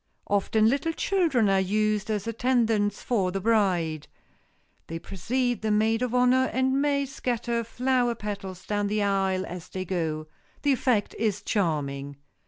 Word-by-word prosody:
Often 215 Hz, +2 st, +2 dB
little 285 Hz, +7 st, +1 dB
children 320 Hz, -, +2 dB
are 195 Hz, -1 st, +3 dB
used 210 Hz, +2 st, 0 dB
as 210 Hz, -2 st, -1 dB
attendants 225 Hz, -3 st, +1 dB
for 195 Hz, -7 st, +1 dB
the 195 Hz, -, -2 dB
bride. 180 Hz, -8 st, +1 dB, 0.8 s
They 165 Hz, -, -4 dB
precede 245 Hz, +8 st, -2 dB
the 220 Hz, -, -1 dB
maid 220 Hz, +2 st, +2 dB
of 250 Hz, -1 st, -1 dB
honor 250 Hz, +1 st, +4 dB
and 260 Hz, +1 st, +1 dB
may 285 Hz, -1 st, +1 dB
scatter 240 Hz, -3 st, -2 dB
flower 245 Hz, +1 st, 0 dB
petals 195 Hz, -4 st, -6 dB
down 205 Hz, -1 st, 0 dB
the 210 Hz, 0 st, 0 dB
aisle 195 Hz, -2 st, +1 dB
as 180 Hz, -1 st, -8 dB
they 185 Hz, 0 st, -4 dB
go. 160 Hz, -4 st, -2 dB, 0.4 s
The 285 Hz, -1 st, +4 dB
effect 240 Hz, -5 st, +1 dB
is 210 Hz, -2 st, 0 dB
charming. 145 Hz, -9 st, -1 dB
215 Hz, 150 wpm, -26 LUFS, 190-245 Hz, 0.8 s, honor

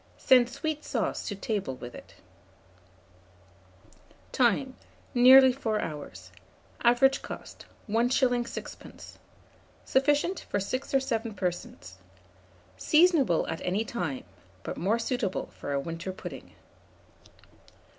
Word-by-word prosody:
Send 250 Hz, -2 st, +5 dB
sweet 305 Hz, +3 st, -4 dB
sauce -, -, -2 dB
to 205 Hz, -, -3 dB
table 195 Hz, -, -3 dB
with 120 Hz, -1 st, -9 dB
it. -, -, -13 dB, 2.2 s
Time. 260 Hz, +2 st, +1 dB, 0.4 s
Nearly 260 Hz, +1 st, +8 dB
4 225 Hz, -5 st, -2 dB
hours. 95 Hz, -, -7 dB, 0.5 s
Average 245 Hz, +3 st, +4 dB
cost, -, -, -9 dB, 0.2 s
1s. 245 Hz, +2 st, +1 dB
6d. -, -, -10 dB, 0.7 s
Sufficient 290 Hz, +7 st, +1 dB
for 205 Hz, -, 0 dB
6 255 Hz, +8 st, -3 dB
or -, -, +6 dB
7 230 Hz, -4 st, -3 dB
persons. 95 Hz, -, -5 dB, 0.8 s
Seasonable 305 Hz, -, +3 dB
at 165 Hz, -, -4 dB
any 195 Hz, +5 st, -1 dB
time; 165 Hz, -, -4 dB, 0.4 s
but -, -, -5 dB
more 200 Hz, +7 st, 0 dB
suitable 230 Hz, -4 st, -2 dB
for -, -, -7 dB
a 140 Hz, -, 0 dB
winter 165 Hz, +5 st, -5 dB
pudding. 185 Hz, -, -10 dB
230 Hz, 105 wpm, -28 LUFS, 180-260 Hz, 2.2 s, Nearly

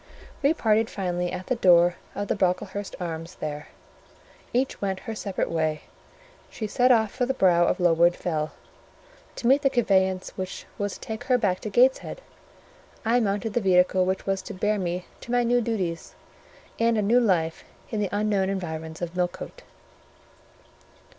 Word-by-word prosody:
We 295 Hz, +3 st, +3 dB
parted 220 Hz, -4 st, +2 dB
finally 180 Hz, -2 st, -2 dB
at 180 Hz, 0 st, -5 dB
the 255 Hz, -, 0 dB
door 175 Hz, -4 st, +5 dB, 0.2 s
of 205 Hz, 0 st, -3 dB
the -, -, +1 dB
Brocklehurst 190 Hz, +1 st, -1 dB
Arms 165 Hz, 0 st, -5 dB
there: 150 Hz, -1 st, -5 dB, 0.8 s
each 260 Hz, +2 st, -1 dB
went 190 Hz, -2 st, -2 dB
her 225 Hz, -, -5 dB
separate 200 Hz, -3 st, -3 dB
way; 155 Hz, -2 st, -1 dB, 0.7 s
she 220 Hz, -, -5 dB
set 245 Hz, +4 st, +3 dB
off 220 Hz, -4 st, +3 dB
for 250 Hz, -1 st, -1 dB
the 265 Hz, -, -1 dB
brow 175 Hz, -5 st, +4 dB
of -, -, 0 dB
Lowood 175 Hz, 0 st, +4 dB
Fell 155 Hz, -3 st, -2 dB, 0.8 s
to -, -, -7 dB
meet 270 Hz, +4 st, +5 dB
the 275 Hz, -, +3 dB
conveyance 190 Hz, -7 st, +1 dB
which 185 Hz, 0 st, -6 dB
was 205 Hz, -1 st, -2 dB
to -, -, -14 dB
take 220 Hz, +2 st, -6 dB
her 255 Hz, -1 st, +3 dB
back 190 Hz, -6 st, 0 dB
to 215 Hz, -, -5 dB
Gateshead, 255 Hz, -, +2 dB, 0.9 s
I 235 Hz, +2 st, +3 dB
mounted 205 Hz, -1 st, -1 dB
the 240 Hz, -, +1 dB
vehicle 185 Hz, -1 st, +4 dB
which 190 Hz, +1 st, -1 dB
was 195 Hz, -1 st, 0 dB
to -, -, -8 dB
bear 210 Hz, +2 st, 0 dB
me 180 Hz, 0 st, -3 dB
to 245 Hz, 0 st, 0 dB
new 240 Hz, +1 st, +2 dB
duties 190 Hz, -8 st, -3 dB, 0.6 s
and 230 Hz, 0 st, +3 dB
a 210 Hz, -, +1 dB
new 230 Hz, +5 st, +4 dB
life 170 Hz, -8 st, +1 dB, 0.3 s
in 220 Hz, -, -1 dB
the 205 Hz, -2 st, 0 dB
unknown 205 Hz, -2 st, +1 dB
environs 160 Hz, -3 st, -4 dB
of 175 Hz, 0 st, -5 dB
Millcote. 180 Hz, -, -3 dB
195 Hz, 165 wpm, -25 LUFS, 180-225 Hz, 0.9 s, door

